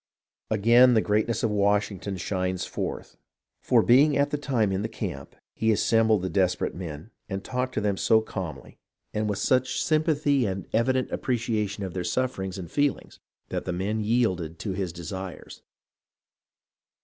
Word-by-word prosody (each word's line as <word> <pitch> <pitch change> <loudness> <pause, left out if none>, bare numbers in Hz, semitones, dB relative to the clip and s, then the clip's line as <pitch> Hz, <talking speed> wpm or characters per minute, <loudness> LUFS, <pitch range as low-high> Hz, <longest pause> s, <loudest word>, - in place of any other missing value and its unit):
Again 120 +4 +5
the - - +5
greatness 110 +3 0
of 115 - +1
Washington 100 -1 0
shines 90 0 -2
forth; - - -5 0.4
for, - - +3
being 140 +4 +5
at 140 0 +2
the 150 - 0
time 120 -8 +1
in 95 +1 -1
the 110 - -1
camp, - - -6 0.2
he 110 0 +1
assembled 110 -2 +3
the - - 0
desperate 90 -2 +1
men 85 +3 -7 0.2
and 95 -1 -4
talked 125 0 -3
to - - 0
them 100 -2 0
so 110 - +4
calmly 95 -7 -7 0.3
and 105 0 -1
with 100 - -1
so 130 +5 +3
much 130 0 -3
sym 155 -1 +2
PEACE 155 -2 -1
403 145 - +3
pathy 100 - 0
and 95 -1 -5
evident 130 +3 +1
appreciation 110 -5 -1
of 95 -3 -5
their 90 - -3
sufferings 95 -6 -2
and 85 -3 -8
feelings, 145 -1 -1 0.3
that - - -3
the 90 - -2
men 105 +5 -1
yielded 95 -8 0
to 100 - -4
his 95 -2 -2
desires. 90 +1 -7
105 Hz, 175 wpm, -26 LUFS, 95-120 Hz, 0.4 s, Again